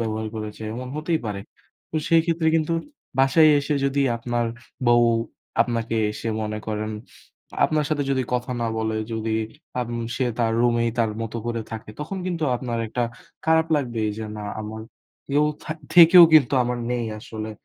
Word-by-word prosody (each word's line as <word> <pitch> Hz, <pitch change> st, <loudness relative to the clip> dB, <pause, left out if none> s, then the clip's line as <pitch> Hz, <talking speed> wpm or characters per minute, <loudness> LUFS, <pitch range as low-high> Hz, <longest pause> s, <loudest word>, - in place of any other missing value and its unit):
ব্যবহার 110 Hz, -1 st, -2 dB
করেছে, 110 Hz, 0 st, -6 dB
এমন 125 Hz, +2 st, -6 dB
হতেই 160 Hz, +1 st, 0 dB
পারে। 100 Hz, -2 st, -3 dB, 0.5 s
তো 160 Hz, -, -3 dB
সেই 165 Hz, -1 st, +6 dB
ক্ষেত্রে 165 Hz, -1 st, +1 dB
কিন্তু 160 Hz, +1 st, 0 dB, 0.5 s
বাসায় 155 Hz, +4 st, +6 dB
এসে 145 Hz, +1 st, -1 dB
যদি 140 Hz, +1 st, +1 dB, 0.2 s
আপনার 120 Hz, 0 st, -1 dB, 0.4 s
বউ 120 Hz, 0 st, +6 dB, 0.6 s
আপনাকে 115 Hz, -1 st, -2 dB, 0.2 s
এসে 115 Hz, -, -5 dB
মনে 105 Hz, 0 st, -3 dB
করেন, 110 Hz, 0 st, -2 dB, 0.7 s
আপনার 155 Hz, -1 st, +1 dB
সাথে 150 Hz, -2 st, 0 dB
যদি 130 Hz, -1 st, +1 dB
কথা 125 Hz, +1 st, -1 dB
না 115 Hz, -, 0 dB
বলে, 110 Hz, 0 st, -1 dB, 0.2 s
যদি 110 Hz, 0 st, -2 dB, 0.5 s
আম 120 Hz, -1 st, -3 dB, 0.3 s
সে 130 Hz, -, +1 dB
তার 115 Hz, -2 st, +2 dB
রুমেই 120 Hz, -1 st, +2 dB
তার 115 Hz, -2 st, +2 dB
মতো 115 Hz, +1 st, -5 dB
করে 115 Hz, -1 st, -2 dB
থাকে। 110 Hz, -1 st, -7 dB
তখন 155 Hz, +6 st, -4 dB
কিন্তু 170 Hz, -3 st, -1 dB
আপনার 120 Hz, -2 st, -3 dB
একটা 120 Hz, +3 st, -2 dB, 0.4 s
খারাপ 160 Hz, 0 st, +3 dB
লাগবেই 120 Hz, -6 st, -1 dB
যে 110 Hz, -, -4 dB
না 105 Hz, -, -6 dB, 0.2 s
আমার 110 Hz, +1 st, -6 dB, 0.5 s
কেউ 145 Hz, +2 st, +3 dB, 0.2 s
থা -, -, -4 dB, 0.2 s
থেকেও 175 Hz, 0 st, +10 dB
কিন্তু 140 Hz, -5 st, +6 dB
আমার 125 Hz, 0 st, -2 dB
নেই 120 Hz, -1 st, -1 dB
আসলে। 110 Hz, 0 st, -6 dB
120 Hz, 165 wpm, -24 LUFS, 110-150 Hz, 0.7 s, থেকেও